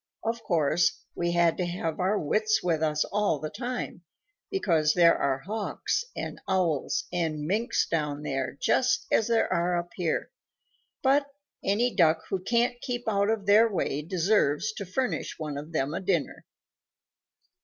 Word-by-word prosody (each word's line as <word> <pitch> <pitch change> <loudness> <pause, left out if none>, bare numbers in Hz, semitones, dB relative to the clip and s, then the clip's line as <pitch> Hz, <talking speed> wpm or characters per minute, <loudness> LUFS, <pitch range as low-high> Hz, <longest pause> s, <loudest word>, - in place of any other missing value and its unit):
Of 230 +1 -2
course, 160 -1 +1
we 170 0 -1
had 170 -1 +3
to 180 - 0
have 165 -2 -3
our 190 +3 +2
wits 215 +6 +1
with 165 -3 +1
us 155 -1 +1
all 205 -6 0
the 155 +1 -5
time, 245 -7 -4 0.5
because 165 - +2
there 170 -2 +6
are 135 -1 0
Hawks 215 - -2
and - - -5
Owls 180 -7 0
and 160 -4 -1
Minks 215 +9 +1
down 150 -2 -2
there 135 -2 -3
just 255 -1 +2
as 220 - +3
there 230 -1 +2
are 175 +1 +1
up 175 0 -4
here, 170 - -2 0.7
but 280 +1 +3 0.4
any 230 +5 +1
Duck 160 -3 +3
who 195 - -1
can't 240 +5 0
keep 245 -1 -3
out 200 -1 +2
of 220 -3 -1
their 215 +3 +5
way 150 -6 -1
deserves 175 +1 +1
to 200 -3 -7
furnish 255 +8 -2
one 150 -2 -4
of 150 +3 -7
them 150 -2 -1
a - - -2
dinner. 180 -5 -1
180 Hz, 160 wpm, -27 LUFS, 155-220 Hz, 0.7 s, there